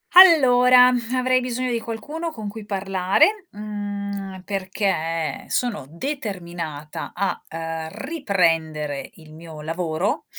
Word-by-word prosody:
Allora, 255 -8 +8 0.2
avrei 255 0 +3
bisogno 250 0 -2
di 235 - 0
qualcuno 290 +10 -5
con 220 -7 -7
cui 210 +1 -7
parlare, 195 - +2
mhmm, 200 -2 -5
perché 185 -5 -2
sono 230 - -1
determinata 170 - -5
a, 195 +1 -1
uhm, 165 0 -4
riprendere 165 - 0
il 155 -1 -15
mio 160 -1 -10
lavoro. 165 +2 -2
200 Hz, 105 wpm, -23 LUFS, 165-245 Hz, 0.2 s, Allora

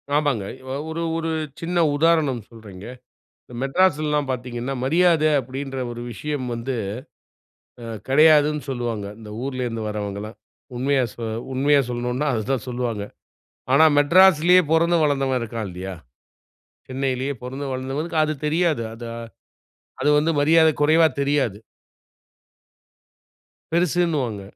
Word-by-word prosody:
ஆமாங்க. 145 -9 +1 0.5
ஒரு 165 +1 -4 0.2
ஒரு 165 0 -2 0.3
சின்ன 175 +1 -2 0.2
உதாரணம் 150 -6 +2
சொல்றேங்க. 105 -4 -12 0.6
இந்த 125 - -14
மெட்ராஸ்லலாம்! 150 -2 +1
பாத்ததீங்கன்னா 125 +1 -4
"மரியாத" 165 +1 +3 0.2
அப்டின்ற 135 +2 -6
ஒரு 120 - -7
விஷயம் 145 +1 -4
வந்து 120 +3 -4 1.1
அ - - -7 0.2
கெடையாதுன்னு 150 +1 +4
சொல்லுவாங்க. 120 -5 -3
இந்த 105 -2 -11
ஊரிலேருந்து 125 -4 -3
வர்றவங்கலாம் 105 +1 -5 0.4
உண்மையா 135 0 +1
சொ 120 - -10 0.3
உண்மையா 140 +2 +3
சொல்லணுனா 125 +4 -2
அததான் 120 +2 -2
சொல்லுவாங்க. 120 -4 -3 0.7
ஆனா, 155 +4 +6
மெட்ராஸ்லேயே 180 +3 +6
பொறந்து 170 +1 +3
வளர்ந்தவன் 135 -3 +1
இருக்கான். 115 -2 -4
இல்லையா? 95 +2 -6 1.0
சென்னையிலேயே 130 +1 -2
பொறந்து 135 +3 -5
வளர்ந்தவனுக்கு 140 +6 -3
அது 155 0 -2
தெரியாது. 160 -5 +1
அது, 115 +1 -8 0.9
அது - - +1
வந்து 160 +2 +1
மரியாத 160 +2 +5
கொறைவா 160 +2 +5
தெரியாது. 140 -8 0 2.2
பெருசுன்னுவாங்க. 165 - 0
135 Hz, 110 wpm, -22 LUFS, 120-155 Hz, 2.2 s, ஆனா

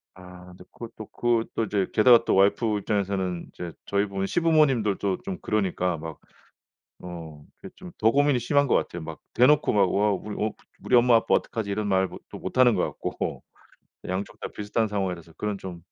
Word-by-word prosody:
아 90 -1 -13
인제 90 0 -15
그것도 110 -2 -9
그것도 115 -1 -1
이제 100 -2 -1
게다가 115 +1 +6
또 - - +2
와이프 105 +2 +3
입장에서는 95 -4 -2
이제 85 -2 -6
저희 100 +1 +1
부모님 95 -1 -3
시부모님들도 135 - +2
좀 190 -1 -4
그러니까 90 -4 -1
막 80 -1 -8 0.9
어 80 -4 -9
그게 - - -11
좀 185 -1 -11
더 110 +1 +3
고민이 145 -2 +3
심한 140 +3 +2
것 - - +4
같아요. 85 -1 -3
막 80 0 -8 0.2
대놓고 145 +5 +4
막 100 -3 +3
"와 105 +1 +2
우리 105 +2 -5
어 110 - -1 0.3
우리 - - 0
엄마 120 -1 +6
아빠 115 - +2
어떡하지." 110 -3 -1
이런 105 +1 -2
말 95 0 +2
못 - - -11
또 - - -9
못 - - -5
하는 125 -3 +6
것 - - +1 0.2
같고 - - -4 0.7
양쪽 95 +2 -4
다 - - -4
비슷한 105 +1 -1
상황이라서 90 -5 -3
그런 105 -1 -3
좀 90 -3 -8
105 Hz, 375 characters per minute, -25 LUFS, 95-115 Hz, 0.9 s, 게다가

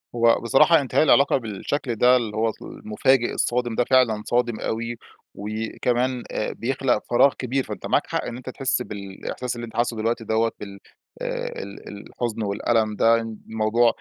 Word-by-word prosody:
هو 115 0 +4
بصراحة 150 +7 +5
انتهاء 135 +3 +2
العلاقة 140 -2 +5
بالشكل 120 +3 -3
ده 125 +3 +5
اللي 110 -4 -1
هو 110 0 +2
المفاجئ 120 +3 0
الصادم 120 -1 -1
ده 125 - +3
فعلًا 120 -4 +3
صادم 120 -2 0
أوي 115 +1 -3 0.4
وكمان 120 +4 -2
آآ 110 - -2
بيخلق 130 -1 0
فراغ 125 +3 +5
كبير. 130 +1 -2
فأنت - - -7
معاك - - +1
حق - - -2
إن 120 - -5
أنت 130 - -8
تحس 130 -1 -1
بالإحساس 105 +4 -6
اللي 120 0 -5
أنت 110 - -13
حاسّه 120 -1 0
دلوقتي 115 +1 -1
دَوَّة 110 +1 +1
بال 100 -1 -9 0.4
آآ - - -4
ال 100 0 -11
الحُزن 110 +3 -5
والألم 110 +1 0
ده، 115 +2 +4
الموضوع 110 +1 0
115 Hz, 165 wpm, -23 LUFS, 110-125 Hz, 0.4 s, بصراحة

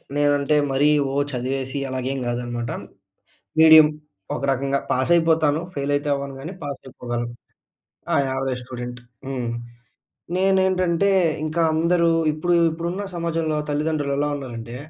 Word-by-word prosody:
నేనంటే 145 0 +2 0.2
మరీ 140 +2 +3 0.2
ఓహ్, 140 +1 +1
చదివేసి 130 +2 -3
అలాగేం 130 +1 -2
గాదనమాట. 120 -1 -3 0.9
మీడియం 160 -1 +9 0.5
ఒక - - -5
రకంగా 135 +1 0
పాస్ 130 +6 +1
అయిపోతాను, 160 -2 +3
ఫెయిల్ 140 0 -2
అయితే 145 +1 -1
అవ్వను 140 -1 -4
గాని 160 +7 -6
పాస్ 140 -1 -5
అయిపోగలను. 120 -2 -4 0.8
ఆ! - - +3
Average 130 -1 -2
student. 125 -1 -7 0.3
హ్మ్. 130 -3 -3 0.9
నేనేంటంటే 190 -1 +2 0.3
ఇంక 155 +1 -4 0.2
అందరూ 170 +1 +2 0.2
ఇప్పుడు 175 +3 0 0.2
ఇప్పుడున్న 170 +4 -3
సమాజంలో 165 -2 -1
తల్లిదండ్రులు 145 -1 0
ఎలా 145 - +1
ఉన్నారంటే. 120 -3 -7
145 Hz, 120 wpm, -23 LUFS, 130-160 Hz, 0.9 s, మీడియం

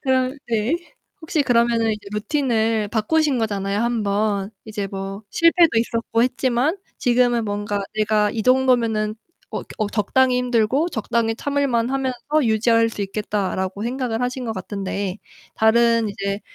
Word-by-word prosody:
그럼 260 0 +1
네. 230 +5 +1 0.5
혹시 320 -2 0
그러면은 235 -3 +2
이제 210 -1 -8
루틴을 225 -3 0
바꾸신 265 +6 +1
거잖아요, 200 -2 -1
1 235 -1 0
번. 200 -1 0
이제 210 -2 -4
뭐 195 +1 -6
실패도 335 0 +4
있었고 230 0 0
했지만 255 +5 +1 0.2
지금은 240 -1 +2
뭔가 205 0 -2
'내가 215 -1 +2
이 220 - -3
정도면은 235 -4 +2 0.4
어 - - -4
겨 - - -17
어 215 -2 0
적당히 250 +5 +2
힘들고 250 +6 +1
적당히 225 -2 0
참을만하면서 270 +1 0
유지할 230 0 +3
수 220 - -7
있겠다.'라고 195 -1 -2
생각을 240 -1 -2
하신 250 +1 -2
것 225 - -2
같은데 195 0 -4 0.4
다른 230 0 +3
이제 200 0 -3
230 Hz, 310 characters per minute, -21 LUFS, 210-255 Hz, 0.5 s, 실패도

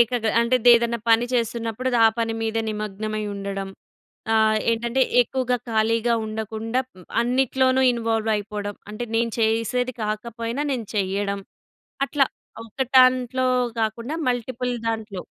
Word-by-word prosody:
ఏకగ్ర 235 -1 +2
అంటే 235 +2 +3 0.2
ఏదైనా 235 0 +1
పని 225 +1 +5
చేస్తున్నప్పుడు, 235 0 -1 0.2
ఆ - - +9
పని 225 -1 0
మీదే 225 0 -1
నిమగ్నమై 215 0 -3
ఉండడం. 195 -1 -4 0.7
ఆహ్, 220 -1 +4
ఏంటంటే 235 +3 0 0.2
ఎక్కువగా 250 0 -1
ఖాళీగా 225 +1 +2
ఉండకుండా 220 +2 -3
హ్మ్, 185 -8 -18 0.2
అన్నిట్లోనూ 260 +1 +2
ఇన్‌వా‌ల్వ్ 225 -2 -1
అయిపోవడం. 205 0 -4 0.2
అంటే 215 +3 -4
నేను 230 0 +1
చేసేది 230 +3 +1
కాకపోయినా 230 +4 -3
నేను 240 -5 -3
చెయ్యడం. 200 0 -1 0.6
అట్లా 280 -1 +2 0.4
ఒక 230 +4 -6 0.2
దాంట్లో 255 0 +4 0.3
కాకుండా 230 +5 -2
మల్టిపుల్ 250 0 -1
దాంట్లో. 220 -4 -3
230 Hz, 120 wpm, -23 LUFS, 215-245 Hz, 0.7 s, ఆ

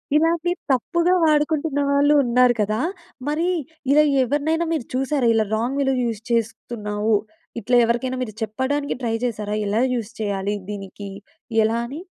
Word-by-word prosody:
ఇలాగే 330 +2 +2 0.2
తప్పుగా 340 +8 +2
వాడుకుంటున్న 300 -1 +2
వాళ్ళూ 285 +1 +4
ఉన్నారు 250 0 +4
కదా! 215 +1 0 0.5
మరి, 310 +4 0 0.4
ఇలా 300 +2 +6 0.2
ఎవరినైనా 300 +6 0
మీరు 300 -8 -2
చూశారా, 265 0 +1
ఇలా 220 -1 +2
రాంగ్ 245 +5 -1
వేలో 270 -1 +2
యూజ్ 225 -3 -2
చేస్తున్నావు, 220 -2 -1 0.5
ఇట్లా 245 - +1
ఎవరికైనా 255 +3 -1
మీరు 215 -4 -7
చెప్పడానికి 260 +6 -2
ట్రై 230 -2 0
చేశారా, 210 -3 -2
ఎలా 215 +4 +1
యూజ్ 230 -2 -4
చేయాలి 200 -1 -1
దీనికి, 200 0 -7 0.5
ఎలా 225 +2 +1
అని? 290 +6 -7
250 Hz, 140 wpm, -22 LUFS, 220-290 Hz, 0.5 s, ఇలా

